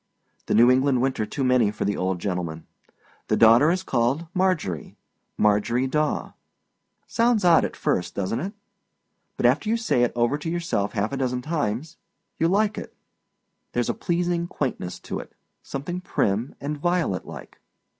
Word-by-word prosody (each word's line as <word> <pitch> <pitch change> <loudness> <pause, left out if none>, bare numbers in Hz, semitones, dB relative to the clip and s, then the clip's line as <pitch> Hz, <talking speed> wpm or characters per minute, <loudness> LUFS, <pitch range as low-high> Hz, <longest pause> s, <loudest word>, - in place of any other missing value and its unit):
The - - +1
New 120 +3 +7
England 130 0 +3
winter 125 -4 0
too 140 - -3
many 125 -4 +3
for 105 - -3
the 100 0 0
old 95 0 -1
gentleman. 85 -3 -4 0.6
The - - +1
daughter 115 +7 +6
is 185 +2 0
called 130 +3 0
Marjorie 180 - -1 0.4
Marjorie 105 +5 +2
Daw. 150 +3 -1 0.7
Sounds 230 -4 +2
odd 170 -2 +6
at - - -3
first, 90 - -1
doesnât 115 - -2
it? 200 - -9 0.8
But - - 0
after 215 - +3
you 230 - +2
say 225 - +1
it 120 - +3
over 120 +5 +1
to 160 - -4
yourself 170 - -1
half 105 +2 -1
a 140 - -3
dozen 125 -1 -1
times, 150 0 -2 0.4
you 165 - +3
like 205 +3 +1
it. - - -10 0.8
Thereâs 120 -1 0
a - - -4
pleasing 175 0 -1
quaintness 125 - -3
to - - -5
it, - - -10 0.3
something 160 +7 -5
prim 115 - -1
and 145 +1 -4
violet 175 - 0
like. - - -10
135 Hz, 165 wpm, -24 LUFS, 110-170 Hz, 0.8 s, New